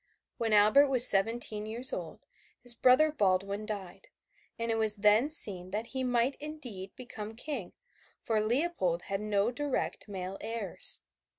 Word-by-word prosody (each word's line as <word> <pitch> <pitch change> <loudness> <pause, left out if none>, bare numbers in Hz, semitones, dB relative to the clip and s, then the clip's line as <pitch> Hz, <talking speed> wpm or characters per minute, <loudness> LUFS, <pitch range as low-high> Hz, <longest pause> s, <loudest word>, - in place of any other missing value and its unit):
When 225 -1 -2
Albert 215 +7 +5
was 255 -3 +4
seventeen 215 +1 +1
years 240 +4 -1
old, - - -7 0.3
his 245 -1 +7
brother 255 +6 +3
Baldwin 200 -3 -1
died, 205 - -8 0.5
and 230 0 -3
it 225 - -1
was 215 -1 +2
then 210 +6 +3
seen 190 - 0
that 210 +4 -4
he 260 +2 -5
might 245 +1 0
indeed 245 -11 -8
become 225 -4 -9
King, 250 - -6 0.5
for 220 -2 -1
Leopold 215 - -1
had 195 +1 -4
no 210 +1 0
direct 280 -1 -4
male 190 -1 -7
heirs. 220 -4 +4
220 Hz, 150 wpm, -29 LUFS, 200-250 Hz, 0.5 s, his